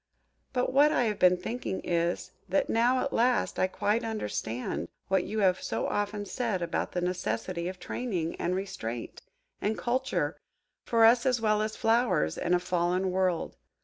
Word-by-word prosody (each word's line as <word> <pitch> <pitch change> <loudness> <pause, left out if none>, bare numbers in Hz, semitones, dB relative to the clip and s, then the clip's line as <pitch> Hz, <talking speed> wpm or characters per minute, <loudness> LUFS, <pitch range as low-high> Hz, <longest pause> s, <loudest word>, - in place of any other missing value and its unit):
But 250 0 0
what 290 +3 +6
I 245 - +2
have 215 -3 -1
been 180 0 +5
thinking 220 +1 -4
is, 170 0 -1 0.2
that 190 - +1
now, 245 +3 +3
at 280 - -2
last, 245 +2 +2
I 185 - +3
quite 210 +4 0
understand 125 - -3 0.2
what 190 -1 +2
you 215 0 -2
have 185 -2 +3
so - - -2
often 205 0 -2
said 210 -4 -2
about 170 - -2
the 180 - -1
necessity 180 -1 -2
of 185 0 -6
training, 180 -10 -3
and 180 - -1
restraint, 120 - -5 0.4
and 215 +2 0
culture, 255 +2 -1 0.5
for 230 -1 +4
us 235 +3 +5
as 250 -2 +2
well 215 -1 +2
as 215 0 -2
for - - -14
flowers, 225 - +2
in 180 - +2
a - - +2
fallen 180 +1 0
world. 185 -2 0
200 Hz, 175 wpm, -29 LUFS, 180-230 Hz, 0.5 s, what